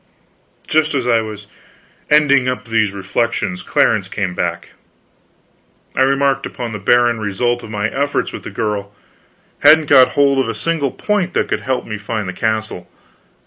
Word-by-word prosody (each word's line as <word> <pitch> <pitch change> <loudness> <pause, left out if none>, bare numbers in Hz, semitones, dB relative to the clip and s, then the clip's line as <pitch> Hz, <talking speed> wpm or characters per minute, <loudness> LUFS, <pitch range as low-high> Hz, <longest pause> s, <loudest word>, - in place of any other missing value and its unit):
Just 155 -1 +1
as 130 -3 -1
I 115 -2 +3
was 105 -2 -8 0.6
ending 140 -3 +4
up 125 0 -3
these 115 -3 +1
reflections, 100 -1 -2
Clarence - - +1
came 95 -3 -3
back. - - -3 1.3
I - - +1
remarked 135 0 +2
upon 120 -2 -6
the 105 - -5
barren 120 +3 +3
result 120 +4 -1
of 115 - -10
my 105 -1 -1
efforts 140 +5 -2
with - - -6
the - - -8
girl; 105 -2 -4 0.6
hadn't 155 -1 +5
got 130 -2 +6
hold 140 -1 +4
of 130 -4 0
a 115 - -3
single 145 +5 -1
point 200 +3 -2
that - - 0
could - - 0
help 130 -1 -2
me 105 -2 -6
to - - -17
find 105 -2 -3
the 90 - -4
castle. 110 -3 -3
120 Hz, 170 wpm, -17 LUFS, 105-140 Hz, 1.3 s, got